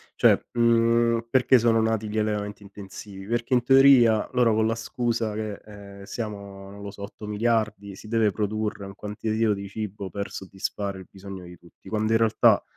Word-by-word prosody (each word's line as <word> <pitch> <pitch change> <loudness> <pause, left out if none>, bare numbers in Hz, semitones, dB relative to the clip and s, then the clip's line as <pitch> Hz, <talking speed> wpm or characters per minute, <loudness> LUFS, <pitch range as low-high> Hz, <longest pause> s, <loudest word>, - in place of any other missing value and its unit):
cioè, - - +4
mhmm, 115 0 +3
perché 130 +1 +4
sono 115 -1 +3
nati 110 -1 0
gli 105 +1 -2
allevamenti 105 -1 -2
intensivi: 100 0 -10
perché 120 +4 0
in 125 - +2
teoria 130 -4 +5
loro 120 -3 +3
con 110 0 +2
la 115 - 0
scusa 115 -1 -2
che, 105 -1 -4
ehm, 100 -1 -12
siamo, 100 -3 -7
non 100 +1 -11
lo 100 - -6
so, 100 0 -13
8.000.000.000, 105 -1 -2
si - - -12
deve 110 -1 +2
produrre 105 0 -3
un 100 - -9
quantitativo 110 +2 -1
di 100 0 -7
cibo 100 -2 -6
per 100 +3 -4
soddisfare 95 0 -5
il 95 - -12
bisogno 95 -2 -10
di 90 0 -12
tutti, 85 - -17
quando 110 0 0
in 115 - +4
realtà 110 -1 +4
105 Hz, 180 wpm, -25 LUFS, 100-115 Hz, -, teoria